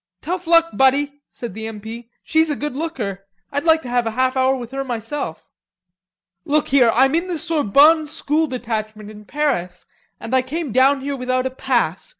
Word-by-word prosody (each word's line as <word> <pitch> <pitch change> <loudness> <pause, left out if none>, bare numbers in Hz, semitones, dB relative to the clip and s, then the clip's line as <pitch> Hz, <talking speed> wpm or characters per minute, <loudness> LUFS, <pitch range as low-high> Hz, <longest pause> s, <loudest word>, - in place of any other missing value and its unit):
"Tough 355 +2 -4
luck, 335 0 +5
buddy," 280 +2 +2
said 235 -6 -7
the 220 +2 -6
M. 220 -2 -7
P. 230 +2 -9
"She's 320 0 +2
a 295 - 0
good 295 -2 -4
looker. 220 - -4 0.2
I'd 285 +3 -2
like 320 -1 +4
to - - -8
have 245 -1 +1
a 225 +1 -5
half 260 0 +2
hour 260 0 +2
with 240 -2 -7
her 270 0 -3
myself." 240 - -5 1.0
"Look 300 +1 0
here. 260 -4 +5
I'm 265 +3 +4
in 340 +3 0
the 355 -2 -2
Sorbonne 310 0 +4
School 310 +1 0
Detachment 215 -4 -5
in 210 0 -13
Paris, 205 -12 -2 0.3
and 230 - -7
I 260 - +4
came 295 +2 -4
down 265 +3 +4
here 280 +1 -3
without 255 0 -1
a 260 - -1
pass. 260 - -1
265 Hz, 190 wpm, -20 LUFS, 230-300 Hz, 1.0 s, luck